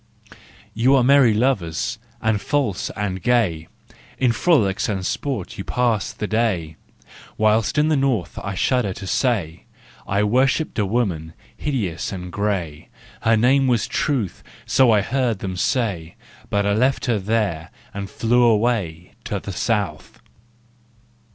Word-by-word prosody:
" - - -23 0.3
You 125 +5 +3
are 130 - +4
merry 135 -2 +5
lovers 115 -2 0 0.2
and 110 -2 +1
false 135 -10 -1
and 95 -3 -3
gay, 100 -11 +1 0.3
" - - -25
In 130 -2 +2
frolics 115 - +2
and 95 -3 -2
sport 140 +5 -3
you - - -3
pass 115 -5 0
the - - -5
day; 105 -8 -1 0.2
( - - -22
" - - -21
Whilst 110 +3 +2
in 150 +1 +3
the 155 - +3
North, 135 - -1
I 100 -1 -5
shudder 120 -1 +1
to 100 - -8
say, 95 - -1 0.2
" - - -25
I 100 +2 +1
worshipped 130 +6 +1
a 105 - +1
woman, 90 -8 -2 0.2
hideous 110 - -3
and 90 -2 -6
gray, 90 -7 -3 0.2
" - - -23
Her 115 0 +3
name 130 +4 +3
was 120 -3 +2
Truth, 125 - -1 0.2
so 130 -2 +4
I 105 -2 +4
heard 120 0 0
them 95 -1 -5
say, 90 -6 -1 0.2
" - - -24
But 100 0 +1
I 100 - +2
left 130 +5 +1
her 115 -4 +1
there 95 -5 -1 0.2
and 100 0 -4
I - - -18
flew 120 +2 +2
away 105 -7 +1
"To - - -2
the 100 - -7
South! 100 -5 -2
110 Hz, 165 wpm, -21 LUFS, 95-125 Hz, 0.3 s, merry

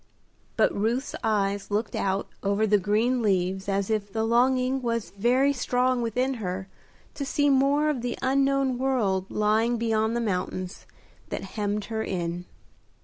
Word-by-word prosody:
But - - +3
Ruth's 230 +7 -1
eyes 200 -2 0
looked 210 +2 -1
out 195 0 -1
over 200 +2 +1
the 210 -1 +3
green 220 +6 +1
leaves 190 -2 0
as 195 +1 0
if 205 -2 -1
the 220 +2 -1
longing 255 +3 +2
was 230 -2 -2
very 250 +7 +2
strong 250 -1 +1
within 250 +4 0
her 190 0 -4 0.5
to 285 - -4
see 290 +1 +2
more 280 +3 +3
of 295 -5 0
the 240 0 -3
unknown 270 -1 +1
world 210 -8 0
lying 220 +3 +1
beyond 225 0 0
the - - +1
mountains 185 -3 -3 0.4
that - - -4
hemmed 210 -1 -2
her 220 - -1
in. 175 -3 -3
220 Hz, 150 wpm, -26 LUFS, 200-255 Hz, 0.5 s, But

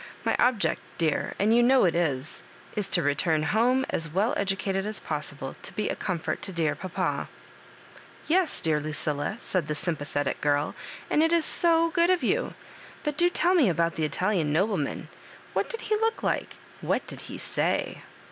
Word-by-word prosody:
My - - +2
object, 245 -4 +2 0.2
dear, 160 -3 0
and 215 +3 +3
you 240 - +6
know 255 -1 +5
it, 170 - +3
is 150 -4 -1 0.5
to 170 0 +2
return 155 +2 +1
home 245 +8 +2
as 165 0 -1
well 200 +9 +1
educated 195 0 -1
as 215 0 -3
possible, 145 -3 -5
to - - -7
be 215 - -1
a - - -1
com 185 -4 -2
fort 160 - -3
to 205 -2 0
dear 165 -4 +1
papa." 185 -2 -3 1.0
"Yes, 350 0 +1
dear 155 -2 +2
Lucilla," 150 +4 -2
said 180 -5 -2
the 150 - -2
Sympathetic 145 -3 -2
giri, 145 -1 +3
'• 145 - -4 0.4
and 300 - +4
it 325 +1 +3
is 335 -2 +4
so 330 -1 +3
good 340 +1 +3
of 370 -1 +2
you; - - 0 0.5
but 295 -2 -1
do 345 +3 +4
tell 355 +1 +2
me 305 - +5
about 170 0 +1
the 160 - -2
Italian 170 0 0
nobleman 180 -2 0 0.2
— - - -21
^what - - 0
did 460 - -5
he 430 - 0
look 450 +1 0
like - - -1
— - - -22
what - - 0
did - - -9
he - - -6
say - - -1
190 Hz, 190 wpm, -27 LUFS, 155-260 Hz, 1.0 s, you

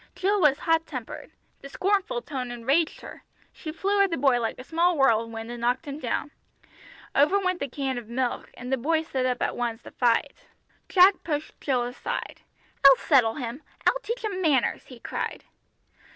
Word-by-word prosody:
Jill 390 +2 +1
was 290 -3 +5
hot 325 0 +1
tempered. 255 -6 -7 0.3
The 275 - -9
scornful 405 - 0
tone 255 -4 -4
enraged 270 +7 0
her. - - -10 0.3
She 315 - -7
flew 400 +5 +1
at 395 - +4
the 330 - -2
boy 255 -3 +3
like 225 - -2
a 255 - -9
small 335 +4 +1
whirlwind 230 -3 +1
and 240 -1 -7
knocked 245 +6 0
him 285 0 -6
down. 280 +2 -2 0.8
Over 295 +8 +4
went 370 -2 -1
the 280 - -2
can 265 -1 -3
of 230 -2 -13
milk, 245 0 -2
and 250 +1 -5
the - - +2
boy 315 +6 +1
stood 260 -5 -1
up 250 -1 -1
at - - -1
once 235 -1 -3
to - - -11
fight. 235 -2 +1 0.6
Jack 375 +1 +5
pushed 300 -2 -4
Jill 255 -4 +1
aside. 245 +2 -5 0.4
"I'll 275 -1 +10
settle 250 -6 +3
him! 250 0 -5 0.2
I'll - - +3
teach 475 +1 -4
him 395 -4 -2
manners!" 290 -8 +1
he 250 -3 -12
cried. - - -4
275 Hz, 185 wpm, -26 LUFS, 245-335 Hz, 0.8 s, I'll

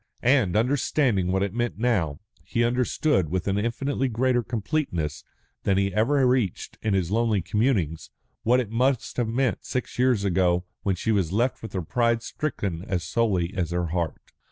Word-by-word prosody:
And, 120 -8 +3
understanding 120 -4 +2
what 95 +1 +1
it 100 -1 -2
meant 120 -2 -2
now, 100 -11 0 0.2
he 120 - 0
understood, 120 - +1
with 90 +2 -2
an 100 +1 +1
infinitely 130 +5 -1
greater 125 +1 +1
completeness 105 - -2 0.4
than 95 -1 +1
he 100 0 +1
had - - -12
ever 130 +7 +3
reached 125 -7 0
in 105 -3 +1
his 90 -2 0
lonely 110 -1 +2
communings, 95 - 0 0.3
what 125 +3 +3
it 115 -4 -3
must 125 +2 0
have 120 -2 +1
meant 125 +1 0
six 125 -1 -4
years 125 -5 +3
ago 90 -1 +2 0.2
when 95 -2 0
she 110 +5 -1
was 95 -6 +1
left 120 +6 0
with 110 - -8
her 95 -3 -2
pride 115 +5 +1
stricken 100 - -3
as 90 -3 -1
sorely 95 -2 0
as 85 -3 -1
her 85 -1 -1
heart. 85 -1 -3
110 Hz, 180 wpm, -25 LUFS, 90-125 Hz, 0.4 s, And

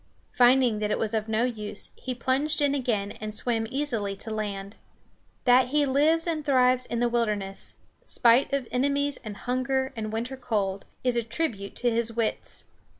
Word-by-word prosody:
Finding 245 -3 +4
that 210 0 -1
it - - +1
was 220 0 -1
of 220 -1 -1
no 220 +1 +1
use, 215 -4 -3
he 255 -1 -5
plunged 270 +5 0
in 285 -1 +3
again 225 -7 -1
and 215 0 -3
swam 225 0 -1
easily 235 -8 -1
to 220 +3 -7
land. 200 -1 -4 0.7
That 250 0 +5
he 295 +2 +2
lives 300 +5 +3
and 320 -3 -1
thrives 255 -2 +3
in 235 - -2
the 240 - +3
wilderness, 210 -5 -1 0.3
spite 240 +4 +3
of 275 -3 -1
enemies 280 +2 +1
and 210 -3 -7
hunger 265 +2 -1
and 215 -1 -4
winter 240 +4 -3
cold, 205 -6 -2 0.2
is 250 -1 +1
a 235 - +2
tribute 225 -4 -3
to 240 -1 +1
his 230 0 0
wits. 230 -1 -2
240 Hz, 175 wpm, -27 LUFS, 215-265 Hz, 0.7 s, That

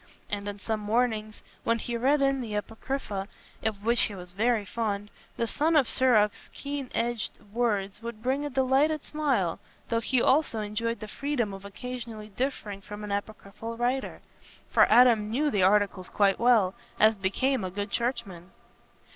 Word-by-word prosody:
And 205 0 -2
on 205 - -6
some 220 +2 -2
mornings, 215 0 -1 0.2
when 230 0 +2
he 235 +1 -4
read 275 +4 +3
in 275 -1 +2
the 220 -4 -4
Apocrypha, 210 -2 -3 0.4
of 215 -2 -2
which 235 +1 +3
he 205 - 0
was 180 -1 -9
very 220 +1 +1
fond, 205 -1 -3 0.3
the 235 - +1
son 310 +7 +1
of 280 -5 +5
Sirach's 220 -5 +2
keen 280 -2 -5
edged 235 -1 -1 0.2
words 210 -4 0
would 230 -1 -7
bring 265 +3 0
a 290 - -2
delighted 270 +3 +2
smile, 265 - 0 0.3
though 230 - +2
he 250 +2 +1
also 260 -2 +3
enjoyed 215 +2 -2
the 215 - -5
freedom 240 -3 -2
of 195 0 -9
occasionally 225 0 -7
differing 210 -3 -3
from 210 +1 -8
an 210 - -5
Apocryphal 215 +2 -5
writer. 250 +3 -1 0.5
For - - +5
Adam 235 -4 +6
knew 290 +6 +1
the 205 - +1
Articles 195 -1 +2
quite 200 -2 +2
well, 225 -6 +4 0.3
as 220 +1 +6
became 210 +6 0
a 185 - -2
good 200 +2 -4
churchman. 195 -8 -2
225 Hz, 165 wpm, -28 LUFS, 205-250 Hz, 0.5 s, Adam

